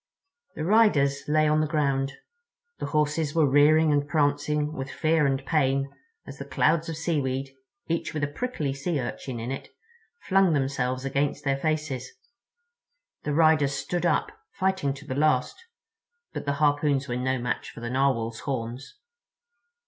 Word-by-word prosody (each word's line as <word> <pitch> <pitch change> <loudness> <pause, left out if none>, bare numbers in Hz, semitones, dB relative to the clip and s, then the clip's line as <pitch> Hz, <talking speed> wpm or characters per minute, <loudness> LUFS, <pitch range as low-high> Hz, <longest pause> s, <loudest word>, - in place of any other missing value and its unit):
The 155 - -4
riders 165 -10 +3
lay 155 +1 +3
on 155 +1 +3
the 155 - 0
ground. 140 -3 0 0.7
The - - -3
horses 150 0 0
were 160 -3 +4
rearing 150 +3 +5
and 145 0 +1
prancing 150 0 +1
with 135 -2 -5
fear 155 -1 +2
and 135 0 -1
pain 135 -3 +1 0.3
as - - -10
the - - -6
clouds 165 +1 +1
of 160 - -4
seaweed, 135 -5 -1 0.3
each 165 0 -2
with 150 -2 -3
a - - +2
prickly 150 - -3
Sea 140 +3 -2
Urchin 125 0 -5
in 115 +3 -4
it, 135 - -6 0.5
flung 195 -3 +3
themselves 130 -2 -1
against 140 +1 -1
their 135 -1 +1
faces. 150 -5 -2 1.2
The 150 - -1
riders 155 -3 +4
stood 175 +6 -1
up, - - +1 0.2
fighting 190 -7 0
to 145 +1 -12
the 150 - -4
last; 145 - +1 0.7
but - - -5
the 140 - 0
harpoons 145 -1 +1
were 120 - -2
no 130 +1 0
match 125 0 -3
for - - -11
the 120 - -4
Narwhal's 120 -4 0
horns. 125 - -5
145 Hz, 155 wpm, -26 LUFS, 135-155 Hz, 1.2 s, rearing